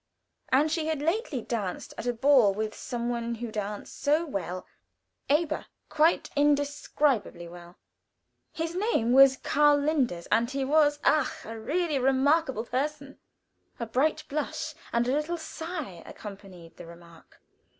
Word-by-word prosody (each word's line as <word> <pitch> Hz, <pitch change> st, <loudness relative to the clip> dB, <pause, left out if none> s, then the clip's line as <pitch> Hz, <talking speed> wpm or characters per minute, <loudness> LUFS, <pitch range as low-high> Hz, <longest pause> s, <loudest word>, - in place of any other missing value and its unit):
And 290 Hz, +4 st, +3 dB
she 315 Hz, -1 st, -1 dB
had 315 Hz, -2 st, -1 dB
lately 330 Hz, -, -1 dB
danced 205 Hz, -6 st, -4 dB
at 245 Hz, -, -6 dB
a 245 Hz, -, +1 dB
ball 240 Hz, -5 st, +4 dB
with 215 Hz, 0 st, -2 dB
some 240 Hz, -1 st, -4 dB
one 235 Hz, -1 st, -2 dB
who 230 Hz, 0 st, -6 dB
danced 210 Hz, -1 st, -5 dB
so 305 Hz, +4 st, +2 dB
well 185 Hz, -, -4 dB, 0.6 s
aber, 300 Hz, +3 st, +1 dB, 0.2 s
quite 310 Hz, +2 st, +2 dB
indescribably 285 Hz, -, +1 dB
well. 175 Hz, 0 st, -12 dB, 0.7 s
His 325 Hz, +1 st, -3 dB
name 365 Hz, -, +1 dB
was 265 Hz, +1 st, +7 dB
Karl 295 Hz, +1 st, +3 dB
Linders, 280 Hz, -, 0 dB
and 235 Hz, +1 st, +3 dB
he 270 Hz, 0 st, -2 dB
was, 295 Hz, +1 st, +3 dB
ach! 305 Hz, -3 st, +1 dB
really 280 Hz, +9 st, -1 dB
a -, -, -1 dB
remarkable 270 Hz, -1 st, +2 dB
person. 280 Hz, +2 st, -3 dB, 0.6 s
A 235 Hz, -, -2 dB
bright 260 Hz, +7 st, 0 dB
blush, 305 Hz, +1 st, -3 dB, 0.2 s
and 235 Hz, +1 st, +1 dB
a -, -, +1 dB
little 305 Hz, +4 st, -1 dB
sigh 315 Hz, -, -6 dB
accompanied 195 Hz, -5 st, -11 dB
the -, -, -10 dB
remark. 170 Hz, -1 st, -16 dB
270 Hz, 140 wpm, -28 LUFS, 220-300 Hz, 0.7 s, was